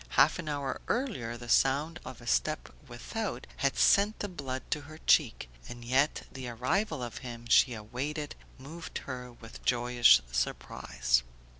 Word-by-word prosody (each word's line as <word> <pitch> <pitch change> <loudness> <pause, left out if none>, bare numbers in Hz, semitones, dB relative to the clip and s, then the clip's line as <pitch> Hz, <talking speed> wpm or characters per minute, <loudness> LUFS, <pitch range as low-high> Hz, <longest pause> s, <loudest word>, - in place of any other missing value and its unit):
Half 140 +7 +5
an 160 -4 -4
hour 140 -2 -3
earlier 190 - -2
the 120 0 -10
sound 145 +7 +2
of 130 -1 -9
a - - -12
step 155 +6 0
without 160 - -4
had 140 0 0
sent 205 +2 +4
the 205 - -3
blood 135 -8 -5
to 150 - 0
her 155 +2 -11
cheek, 120 - +3 0.2
and 120 -1 -8
yet 135 +5 +2
the 130 -2 -7
arrival 150 - -1
of 120 - -6
him 120 -2 -8
she 125 0 +5
awaited 140 +8 -4 0.2
moved 155 +6 -8
her 125 -2 -6
with 115 -1 -13
joyous 120 - +5
surprise. - - 0
130 Hz, 155 wpm, -30 LUFS, 120-155 Hz, 0.2 s, Half